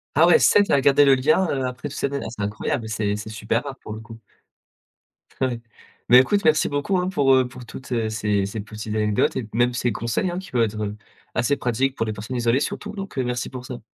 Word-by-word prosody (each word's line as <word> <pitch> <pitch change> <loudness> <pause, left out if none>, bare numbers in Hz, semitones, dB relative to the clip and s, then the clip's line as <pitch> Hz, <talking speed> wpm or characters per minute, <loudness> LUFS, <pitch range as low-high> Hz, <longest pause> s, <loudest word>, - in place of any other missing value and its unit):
Ah 165 +3 +6
ouais, 175 - +7
7 205 0 +4
à 140 - +4
garder 140 +1 +5
le 135 -1 +6
lien, 155 +8 +2
heu, 135 -2 -1
après 125 +3 -5
toutes - - -8
ces - - 0
années. 140 0 -2
Ah, - - -5
c'est 105 -3 -6
incroyable, 110 +3 -2
c'est 105 -1 -1
c'est 105 +1 -7
super 110 +3 -1
rare, 135 -1 -7
pour 105 - -8
le 110 - -7
coup. 115 0 -12 1.2
Ouais. 125 -3 0 0.5
Mais 125 - +9
écoute, 200 +11 +2
merci 155 -1 +3
beaucoup, 145 +7 0
hein, 180 - -1
pour, 140 -8 +3
heu, 130 -1 +3
pour 125 -1 -11
toutes, 130 +2 -10
heu, 115 -2 0
ces 105 -2 0
ces 105 +2 -5
petites 105 +1 -6
anecdotes 105 -1 +1
et 125 -5 -3
même 120 +1 +2
ces 120 -1 0
conseils, 115 - -1
hein, 175 - -4
qui 190 - -11
peuvent 120 -2 +2
être 105 -1 -2 0.4
assez 125 +4 +1
pratiques 130 +2 0
pour 115 - -1
les 110 - -3
personnes 110 +5 -6
isolées 120 +2 +2
surtout 210 +7 -4
donc, 195 -7 -8
heu, 130 - +1
merci 125 0 -3
pour 130 -1 -8
ça. 125 -3 -8
125 Hz, 245 wpm, -23 LUFS, 110-140 Hz, 1.2 s, Mais